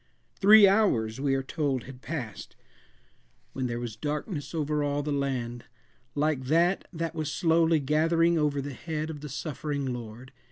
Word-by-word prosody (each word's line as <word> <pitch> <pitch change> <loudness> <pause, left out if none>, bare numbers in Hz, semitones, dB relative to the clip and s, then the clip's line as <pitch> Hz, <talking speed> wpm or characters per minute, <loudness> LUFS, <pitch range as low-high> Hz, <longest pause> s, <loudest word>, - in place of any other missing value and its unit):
Three 210 +1 +8
hours 135 - +2
we 140 -1 +2
are 135 - -1
told 135 -3 -1
had 130 -1 -11
passed, 130 -10 -6 1.0
when 130 -1 -2
there 120 0 -3
was 120 -3 -5
darkness 150 - -4
over 150 -1 0
all 145 0 -1
the 150 - -3
land, 125 -4 -2 0.5
like 145 -3 0
that 170 +7 +2
that 165 -2 -3
was 155 -1 -3
slowly 165 -1 +3
gathering 165 +4 +2
over 145 -3 +1
the 140 0 -5
head 155 +2 -4
of 150 -2 -9
the 150 - -7
suffering 140 -2 -3
Lord. 120 +2 -9
145 Hz, 160 wpm, -28 LUFS, 130-160 Hz, 1.0 s, Three